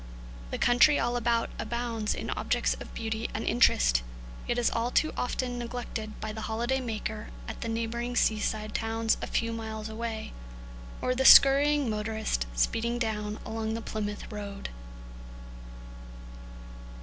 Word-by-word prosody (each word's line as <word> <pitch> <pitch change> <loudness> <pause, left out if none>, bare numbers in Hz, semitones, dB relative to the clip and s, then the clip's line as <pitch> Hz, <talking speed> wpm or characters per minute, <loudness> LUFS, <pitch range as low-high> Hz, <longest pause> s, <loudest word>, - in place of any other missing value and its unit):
The - - -3
country 255 +5 +5
all 240 0 0
about 235 -1 +1
abounds 235 -3 -2
in - - -4
objects - - 0
of - - -9
beauty 220 0 -3
and 220 - -2
interest, - - +4 0.5
yet 240 - 0
is 240 - +2
all 230 +1 0
too 310 +5 +2
often 245 0 -2
neglected 235 -3 -5
by 215 - -4
the 220 - -6
holiday 235 +4 -1
maker 220 -2 -4 0.2
at - - -7
the 230 - -3
neighbouring 235 +2 -2
seaside 215 -1 0
towns 225 0 0
a - - -3
few 230 0 -1
miles 220 -1 -5
away, 220 0 -5 0.7
or 255 - +2
the 260 +1 0
scurrying 280 +1 +7
motorist 215 - -1
speeding 230 - +1
down 210 -2 -2
along 220 0 -3
the - - -3
Plymouth 210 -1 -4
road. 200 -1 -6
225 Hz, 140 wpm, -29 LUFS, 215-240 Hz, 0.7 s, scurrying